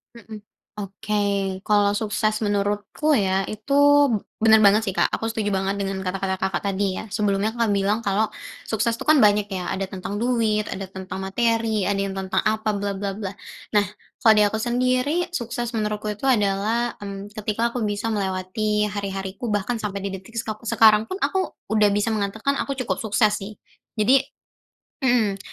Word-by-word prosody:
Heeh. 220 -2 -10 0.4
Oke, 200 -1 -1
kalau 205 -1 +4
sukses 215 0 0
menurut 205 0 0
ku 310 -1 -1
ya 190 -1 +1
itu 215 +6 -4 0.6
bener 220 0 +5
banget 210 +2 +5
sih 195 - -2
Kak, - - +2
aku - - -3
setuju 220 -2 -1
banget 195 0 0
dengan 195 0 -2
kata-kata 190 0 -2
Kakak 190 -1 -1
tadi 195 -1 -1
ya. 220 - -11
Sebelumnya 205 0 0
Kakak 230 -2 0
bilang 205 +3 0
kalau 210 +2 +1 0.3
sukses 225 +1 0
tuh 230 - -7
kan 310 - +7
banyak 210 -3 +4
ya. 185 -2 -3
Ada 190 0 -3
tentang 200 +3 -4
duit, 225 -4 +1
ada 195 0 -4
tentang 190 0 -7
materi, 225 +1 +1
ada 200 +1 0
yang 195 -1 -2
tentang 190 +1 -1
apa, 215 -1 0
bla 200 0 -2
bla 195 0 -4
bla. 200 -2 -4 0.4
Nah, 205 -1 +4 0.4
kalau 220 -2 +6
dari 210 - +6
aku 220 +2 -1
sendiri, 255 +8 0
sukses 240 -4 -3
menurutku 210 -1 -2
itu 265 +7 -1
adalah, 220 +1 +1
mmm, 200 0 -7
ketika 220 +2 -1
aku 245 - -2
bisa 210 +1 -1
melewati 205 +2 -1
hari-hari 195 -2 -4
ku 235 +4 -5
bahkan 210 +3 -1
sampai 200 -2 -3
di 195 - -3
detik 190 +5 -9
skok 215 -2 -4
sekarang 220 -1 +4
pun 375 - -3
aku 380 -1 -1 0.2
udah 210 -1 +4
bisa 205 +2 0
mengatakan 215 +6 -1
aku 275 -1 -3
cukup 190 -3 -2
sukses 215 0 +2
sih. 210 0 -6 0.4
Jadi 255 +6 +5 0.8
Mhm, 235 -7 +2
210 Hz, 175 wpm, -23 LUFS, 195-225 Hz, 0.8 s, kan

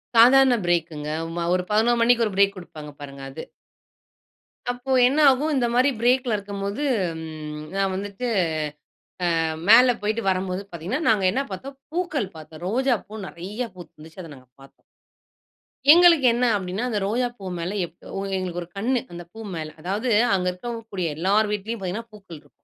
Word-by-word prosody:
சாதாரண 255 +2 +7
ப்ரேக்குங்க. 165 -4 -1 0.3
ம 170 -1 -2
ஒரு 180 - +1
11:00 235 +3 +3
மணிக்கு 235 0 +4
ஒரு 205 - -6
ப்ரெக் 200 +1 +3
குடுப்பாங்க 155 -4 -10
பாருங்க, 140 -1 -9
அது. 135 +4 -8 1.3
அப்போ 245 +2 -6 0.2
என்ன 275 +4 +1
ஆகும்? 290 +4 0
இந்த 250 -3 +2
மாதிரி 255 +3 +4
ப்ரேக்ல 245 0 +2
இருக்கும்போது, 200 +4 -4 0.4
ம் 155 -1 -7 0.2
நான் 195 -1 0
வந்துட்டு, 200 +5 -5 1.1
அ - - +2 0.3
மேல 245 +2 +8
போயிட்டு 215 +2 -1
வரும்போது 185 0 -1
பாத்தீங்கன்னா, 175 - -3
நாங்க 210 -4 +3
என்ன 270 +6 0
பாத்தோம். 270 +8 -7 0.2
பூக்கள் 320 - -2
பாத்தோம். 155 0 -12
ரோஜாப்பூ 220 -2 -1
நிறைய 210 +9 -6
பூத்து 175 -1 -12
இருந்துச்சு. 160 +4 -11
அத 165 - -10
நாங்க 130 -1 -18
பாத்தோம். 135 0 -19 1.1
எங்களுக்கு 340 -5 +6
என்ன 245 +1 +1
அப்படின்னா, 190 +3 -4
அந்த 215 -3 -1
ரோஜா 245 +4 0
பூ 195 - -9
மேல 170 +3 -3
எப் 170 - -16 0.2
ஒ - - -2 0.2
எங்களுக்கு 180 -2 -3
ஒரு 170 - -15
கண்ணு, 245 +5 +1
அந்த 175 0 -7
பூ 220 - -11 0.2
மேல. 160 -1 -4
அதாவது 200 +8 -2 0.3
அங்க 180 -1 -1
இருக்கக்கூடிய 220 -2 -5
எல்லார்வீட்லயும் 210 +4 0
பாத்தீங்கன்னா, 205 +5 -4
பூக்கள் 195 -5 -12
இருக்கும் 145 -1 -20
200 Hz, 160 wpm, -24 LUFS, 175-240 Hz, 1.3 s, மேல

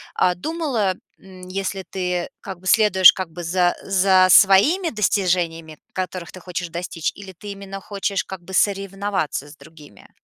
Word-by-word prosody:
а, 180 -1 +2
думала, 250 - -2 0.2
м, 185 -1 -14
если 190 0 -4
ты 180 -2 -3
как 185 -2 -8
бы 185 - -10
следуешь 190 -4 +6
как 185 -3 -5
бы 175 +2 -8
за 175 +1 +1
за 190 -1 +4
своими 215 - +5
достижениями, 175 - -1 0.2
которых 185 -2 -5
ты 185 - -10
хочешь 180 0 -5
достичь, 170 -1 -4
или 195 -1 -10
ты 205 - -7
именно 195 0 -8
хочешь 200 0 -3
как 190 -2 -9
бы 190 - -12
соревноваться 195 -6 -1
с 150 - -14
другими? 145 -7 -17
185 Hz, 160 wpm, -21 LUFS, 175-195 Hz, 0.2 s, следуешь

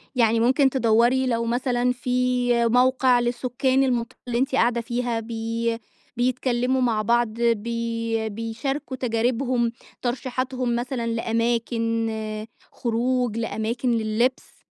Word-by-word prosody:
يعني 230 -2 +3
ممكن 265 +3 +4
تدوَّري 245 +1 +3
لو 230 -1 0
مثلًا 245 +1 +1
في 250 -1 +1
موقع 250 +1 +4
للسكان 250 +2 +1
المط 240 -3 -1
اللي 240 -1 -1
أنت 265 0 0
قاعدة 235 -1 +2
فيها 240 0 -2
بي 230 0 -2 0.4
بيتكلّموا 255 +1 +1
مع 230 -4 +2
بعض 235 +2 +2
بي 230 0 -1
بيشاركوا 230 +6 -4
تجاربهم، 240 0 0 0.3
ترشيحاتهم 255 0 -2
مثلًا 240 0 -2
لأماكن 230 -1 -1 0.2
خروج، 240 0 -1
لأماكن 230 +2 -1
للبس. 230 +3 -1
240 Hz, 105 wpm, -24 LUFS, 230-250 Hz, 0.4 s, ممكن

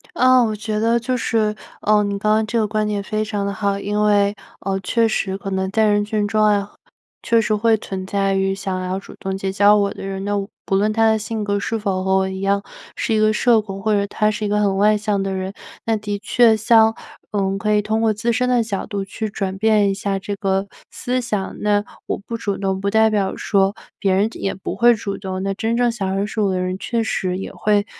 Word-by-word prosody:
啊， 255 0 +5
我 215 -2 -1
觉 210 0 -3
得 230 +1 +2
就 250 +2 -1
是， 215 -2 0 0.3
呃， 210 0 +3
你 200 0 -2
刚 215 +1 +1
刚 220 0 +2
这 235 - 0
个 215 - +1
观 215 0 -1
点 205 -1 -1
非 215 +1 -2
常 205 -2 -2
得 200 - -2
好。 200 0 -1
因 210 +1 -1
为， 205 -1 +3 0.3
呃， 195 -1 -1
确 230 +4 +1
实 195 -3 -1
可 195 - -6
能 190 0 -1
在 220 +2 +3
人 205 0 +3
群 210 -1 -1
中 215 0 +1
啊， 205 -1 +2 0.5
确 230 -1 +3
实 215 0 +1
会 225 +1 +3
存 190 -2 -6
在 195 0 0
于 195 0 +1
想 190 -2 -3
要 185 +1 -2
主 - - -13
动 190 0 -3
结 195 0 -2
交 205 +2 +5
我 200 -1 +1
的 - - -8
人， 195 0 -4
那 205 - -1 0.3
不 195 - 0
论 210 +2 +2
他 225 0 +3
的 220 0 +3
性 220 0 -4
格 205 0 0
是 225 +3 -2
否 195 -3 -2
和 190 0 +2
我 190 - +1
一 190 0 -5
样， 200 0 +1 0.3
是 225 - -1
一 215 - +2
个 215 0 +4
社 225 0 +4
工， 195 -2 -7
或 215 +1 +1
者 200 0 +2
他 210 +1 +1
是 210 0 -3
一 - - 0
个 210 +1 +1
很 200 -2 +2
外 210 +1 +4
向 210 -2 -1
的 195 0 -2
人， 190 +1 -4 0.3
那 225 - +1
的 205 -1 -4
确 225 +1 +4
像 225 0 +5 0.4
嗯， 195 -1 0
可 210 +1 0
以 210 - +3
通 220 +1 -1
过 220 -1 +3
自 230 +3 -1
身 250 +2 +1
的 245 -2 +3
角 205 -4 -3
度 200 -1 -4
去 215 +2 -4
转 195 -2 -3
变 210 -1 +3
一 195 - +1
下 195 0 -2
这 200 +1 -4
个 195 0 -1 0.2
思 255 +1 -2
想。 210 -5 -3
那 205 0 +2 0.2
我 - - -1
不 230 +3 -7
主 200 -3 -2
动， 190 -1 -2
不 200 - 0
代 220 +1 +4
表 205 -3 0
说 195 -1 +2 0.3
别 195 -1 +2
人 195 +3 +3
也 195 - -3
不 190 - -5
会 240 0 +5
主 200 -2 -4
动， 190 -1 -5
那 195 0 -1
真 225 +3 -1
正 245 0 +3
想 195 -5 -2
认 200 - 0
识 215 +1 -3
我 200 - +2
的 185 - -1
人 185 0 -2
确 230 +4 -2
实 185 -4 -1
也 195 - -6
会 210 -1 +1
205 Hz, 270 characters per minute, -20 LUFS, 195-220 Hz, 0.5 s, 啊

